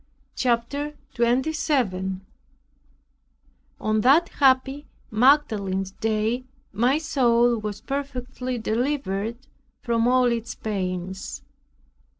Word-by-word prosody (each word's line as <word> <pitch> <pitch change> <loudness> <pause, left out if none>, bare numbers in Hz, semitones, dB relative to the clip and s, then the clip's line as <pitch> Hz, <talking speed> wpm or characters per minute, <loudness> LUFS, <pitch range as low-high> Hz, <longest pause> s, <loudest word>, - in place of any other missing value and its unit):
CHAPTER 260 +5 -1 0.2
27 235 -7 0 1.5
On 215 0 +1
that 285 +9 +5
happy 270 +1 +2 0.2
Magdalene's 215 -7 +2
Day 220 +4 -1 0.3
my 245 +7 +3
soul 240 -6 +2
was 210 -1 -5
perfectly 255 -2 -4
delivered 230 -2 -1 0.5
from 235 -1 +1
all 255 0 +4
its 235 -1 -3
pains. 190 -2 -4
235 Hz, 80 wpm, -24 LUFS, 215-265 Hz, 1.5 s, that